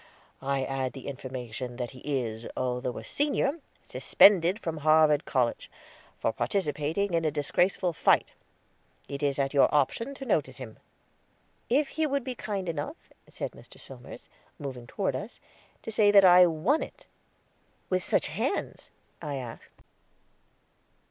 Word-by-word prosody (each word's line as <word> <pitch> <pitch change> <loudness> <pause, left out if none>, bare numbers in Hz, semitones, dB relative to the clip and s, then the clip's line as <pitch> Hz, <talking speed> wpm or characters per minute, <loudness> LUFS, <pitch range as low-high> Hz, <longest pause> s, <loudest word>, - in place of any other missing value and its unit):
I 135 0 0
add 130 -1 -2
the 135 - -10
information 125 -2 -6
that 120 -1 -4
he 130 - -13
is, 120 -5 -3
although 125 0 -2
a - - -6
senior, 290 +1 0 0.2
suspended 190 -1 +5
from 165 -7 -4
Harvard 155 -1 +4
College, 125 -4 0 0.5
for 115 - -1
participating 155 +6 -1
in 165 -1 +2
a 155 - +2
disgraceful 175 +5 +1
fight. - - +3 0.8
It 140 0 -6
is 140 -2 0
at 135 0 0
your 140 - +5
option 190 - 0
to 270 - -8
notice 145 - 0
him." 125 -5 -9 0.9
"If 275 +4 +2
he 315 -1 0
would 280 -2 -1
be 255 0 -4
kind 200 -5 -4
enough," 165 - -5 0.2
said - - -5
Mr. - - -16
Somers, - - -10 0.3
moving 130 -5 -7
toward 190 +8 -2
us, 210 +4 -7 0.4
"to - - -5
say 215 -1 +4
that 200 -1 +7
I 180 0 +8
won 175 - +1
it." - - -8 0.9
"With 185 0 +2
such - - +2
hands?" - - -3 0.3
I 145 -2 -4
asked. 125 -4 -9
150 Hz, 145 wpm, -28 LUFS, 130-200 Hz, 0.9 s, I